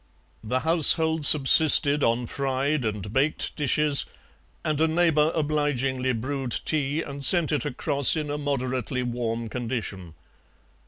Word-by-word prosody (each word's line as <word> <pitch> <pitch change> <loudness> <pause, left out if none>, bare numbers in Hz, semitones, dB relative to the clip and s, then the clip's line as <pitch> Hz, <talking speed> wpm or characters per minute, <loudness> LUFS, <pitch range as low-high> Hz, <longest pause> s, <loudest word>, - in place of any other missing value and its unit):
The 125 +4 -3
household 160 -1 +3
subsisted 145 0 +6
on 115 +1 -1
fried 135 +2 -3
and 105 -1 -6
baked 140 +4 -2
dishes, 150 0 +1 0.6
and 155 -1 -2
a 160 - +2
neighbour 160 -2 0
obligingly 140 -4 -2
brewed 130 +2 -4
tea 150 0 -2
and 140 0 -9
sent 170 0 +3
it 145 -5 -2
across 140 +1 +1
in 150 -2 -5
a 145 - -5
moderately 130 -3 -4
warm 115 -1 -5
condition. 110 -8 -7
140 Hz, 125 wpm, -23 LUFS, 125-150 Hz, 0.6 s, subsisted